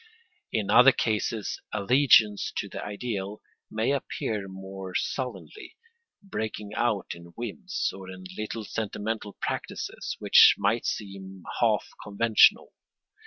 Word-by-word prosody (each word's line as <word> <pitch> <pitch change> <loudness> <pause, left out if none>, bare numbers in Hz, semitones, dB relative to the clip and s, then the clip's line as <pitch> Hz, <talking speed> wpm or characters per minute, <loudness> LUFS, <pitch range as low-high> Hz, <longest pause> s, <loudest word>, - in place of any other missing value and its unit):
In 105 -3 -1
other 125 +2 +8
cases 110 -2 -2
allegiance 110 -1 +4
to - - -2
the - - -7
ideal 105 -1 -4 0.3
may 110 +4 0
appear 110 -6 -2
more 95 -1 -8
sullenly, 130 - -4 0.5
breaking 105 - -5
out 120 -4 0
in 85 0 -13
whims, 185 - -3
or 95 -1 -10
in 95 0 -9
little 110 +1 -4
sentimental 110 -1 -4
practices - - -4
which - - +7
might 115 +4 +1
seem 95 -2 -6 0.2
half - - +2 0.2
conventional. 110 +2 +4
105 Hz, 115 wpm, -27 LUFS, 95-115 Hz, 0.5 s, other